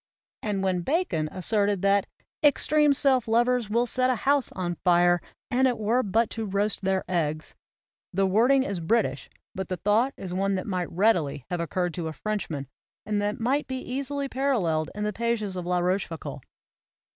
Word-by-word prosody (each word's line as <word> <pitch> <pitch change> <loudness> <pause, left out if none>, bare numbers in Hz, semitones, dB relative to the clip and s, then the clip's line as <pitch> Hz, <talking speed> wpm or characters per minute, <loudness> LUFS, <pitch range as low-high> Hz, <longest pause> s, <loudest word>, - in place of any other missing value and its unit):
And 205 -2 -2
when 185 -2 +1
Bacon 175 - 0
asserted 200 0 0
that 200 0 +3 0.2
' - - -50
'extreme 300 0 +4
self 265 -4 +2
lovers 240 0 +2
will 235 +3 +2
set 255 +1 +2
a 255 - +2
house 275 +4 +1
on 175 -2 -3
fire 175 -1 +4 0.3
and 260 +1 +3
it 245 - 0
were 225 +4 +1
but 225 +1 +1
to 225 -1 -3
roast 200 +2 -1
their 190 -1 0
eggs," 155 -3 -2 0.6
the 195 +2 +1
wording 240 +8 +4
is 200 -9 -3
British 165 - 0 0.2
but 190 -1 -5
the 185 - -2
thought 215 +9 +2
is 180 -2 -6
one 195 +1 0
that 185 - -3
might 185 -4 -2
readily 170 - +1
have 175 - -1
occurred 175 +1 -1
to 170 -1 -4
a 160 - -4
Frenchman 165 -9 -4 0.4
and 210 -1 0
that 205 +1 -2
might 265 +6 0
be 260 - -3
easily 275 +2 -3
paralleled 210 - 0
in 210 - -3
the 210 0 -1
pages 225 -3 -1
of 180 -1 -5
La 180 0 +1
Roche 180 +2 0
foucauld. 150 -4 -7
205 Hz, 185 wpm, -26 LUFS, 180-245 Hz, 0.6 s, extreme